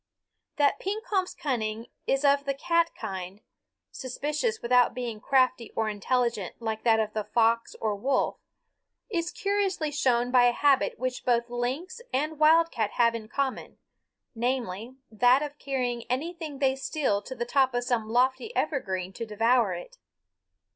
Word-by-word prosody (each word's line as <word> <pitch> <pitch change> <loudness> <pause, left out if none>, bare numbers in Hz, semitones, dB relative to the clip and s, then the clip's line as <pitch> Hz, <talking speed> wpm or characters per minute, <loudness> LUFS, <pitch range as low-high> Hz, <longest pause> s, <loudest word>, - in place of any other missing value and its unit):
That 290 -1 +2
Pekompf's 400 -2 -2
cunning 225 -5 -2 0.2
is 275 +2 +1
of 280 0 +4
the 275 -1 -1
cat 335 +3 +2
kind, 190 -2 -6 0.5
suspicious 300 - -2
without 245 0 +3
being 240 -4 -4
crafty 255 -1 +2
or 220 -1 0
intelligent 215 -1 -1
like 220 -2 -3
that 225 -2 +4
of 215 -1 -1
the 215 - -1
fox 230 +1 +1
or 215 -1 0
wolf, 260 +6 0 0.7
is 340 -3 -1
curiously 395 -6 -1
shown 250 -4 +1
by 250 -1 +6
a 245 - +4
habit 280 +1 +2
which 255 0 -3
both 235 -1 +1
lynx 260 - -3
and 305 +3 -1
wildcat 310 -8 +4
have 235 -1 +3
in 225 -2 -6
common, 270 +2 -3 0.6
namely, 240 -1 -2 0.2
that 245 +5 +4
of 295 0 -7
carrying 250 -4 -2
anything 310 +3 -3
they 265 -1 +2
steal 270 -6 -1
to 260 - -8
the 240 - -3
top 260 0 +2
of 245 - 0
some 240 -3 -1
lofty 255 - +1
evergreen 190 - -2
to 230 - -5
devour 225 -2 +2
it. 175 - -10
250 Hz, 150 wpm, -27 LUFS, 230-285 Hz, 0.7 s, by